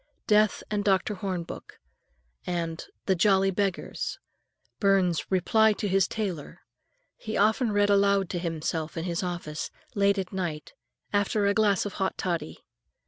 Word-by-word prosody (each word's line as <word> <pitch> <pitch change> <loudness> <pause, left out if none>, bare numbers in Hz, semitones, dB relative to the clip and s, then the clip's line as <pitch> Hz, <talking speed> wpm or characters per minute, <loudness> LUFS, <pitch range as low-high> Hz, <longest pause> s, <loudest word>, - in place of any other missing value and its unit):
"Death 215 0 +3
and 205 -1 0
Dr. 195 +1 +2
Hornbook" 180 -3 -5 0.7
and 170 -2 -3 0.2
"The 190 - +3
Jolly 195 +1 +3
Beggars," 195 -1 -2 0.6
Burns's 190 -4 +2
"Reply 215 +4 +4
to 205 - -3
his 195 -1 +3
Tailor," 185 -9 -4 0.6
he 220 -1 -4
often 220 +3 +3
read 205 0 +3
aloud 200 -1 +3
to 175 - -2
himself 165 -1 -3
in 165 - -2
his 170 -1 -2
office, 175 -4 -4 0.2
late 200 0 +3
at 190 -1 -3
night, 170 -5 -4 0.4
after 205 +1 +1
a 200 - +3
glass 205 -2 +2
of 205 - -4
hot 190 - 0
toddy. 170 - -3
195 Hz, 140 wpm, -27 LUFS, 175-205 Hz, 0.7 s, Reply